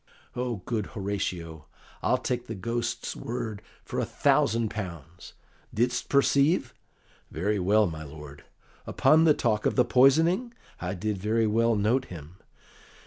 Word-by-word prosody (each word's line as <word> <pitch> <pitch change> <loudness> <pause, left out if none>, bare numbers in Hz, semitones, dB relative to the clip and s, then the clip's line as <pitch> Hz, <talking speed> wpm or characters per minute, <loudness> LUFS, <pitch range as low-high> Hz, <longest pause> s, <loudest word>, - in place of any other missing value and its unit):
"O 125 -1 -2
good 110 -4 -2
Horatio, 90 -5 -4 0.3
I'll - - +2
take 125 -1 -3
the 115 - -5
Ghost's 115 +4 -3
word 115 -4 -5 0.2
for - - -4
a - - +1
thousand 115 0 +1
pounds. 85 -5 -8 0.4
Didst 120 +3 -1
perceive?" 140 +3 +3 0.6
"Very 100 +6 -1
well, 105 +4 +3
my 80 -4 -5
lord." 75 -1 -11 0.4
"Upon 160 +1 +4
the 155 -2 +5
talk 110 -3 0
of - - -1
the 125 - +4
poisoning?" 165 - +3 0.2
"I 90 +2 -3
did 105 +2 -3
very 110 +3 +1
well 115 +2 +2
note 115 +6 +1
him." 85 - -11
110 Hz, 140 wpm, -27 LUFS, 90-125 Hz, 0.6 s, the